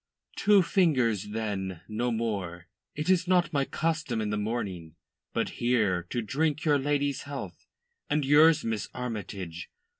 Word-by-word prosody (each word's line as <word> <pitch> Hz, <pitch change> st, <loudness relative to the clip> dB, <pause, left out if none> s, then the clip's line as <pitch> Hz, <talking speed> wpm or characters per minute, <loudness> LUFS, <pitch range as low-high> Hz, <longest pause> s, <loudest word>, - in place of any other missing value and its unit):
"Two 205 Hz, -2 st, +5 dB
fingers, 130 Hz, -, +2 dB
then 100 Hz, -5 st, -3 dB
no 120 Hz, +3 st, -1 dB
more. 100 Hz, -7 st, -3 dB, 0.3 s
It 150 Hz, +1 st, -3 dB
is 185 Hz, -1 st, +3 dB
not 175 Hz, -3 st, +3 dB
my 140 Hz, -1 st, +2 dB
custom 155 Hz, -7 st, -1 dB
in 105 Hz, -1 st, -1 dB
the -, -, 0 dB
morning. 100 Hz, -7 st, -3 dB, 0.4 s
But -, -, -1 dB
here 105 Hz, -8 st, +1 dB
to 120 Hz, -, -2 dB
drink 150 Hz, +6 st, -1 dB
your 145 Hz, -2 st, +4 dB
lady's 145 Hz, 0 st, 0 dB
health, 140 Hz, -1 st, -7 dB, 0.4 s
and 150 Hz, -1 st, +1 dB
yours, 155 Hz, +3 st, +6 dB
Miss 110 Hz, -5 st, -2 dB
Armytage." 95 Hz, -8 st, -5 dB
120 Hz, 145 wpm, -28 LUFS, 105-150 Hz, 0.4 s, yours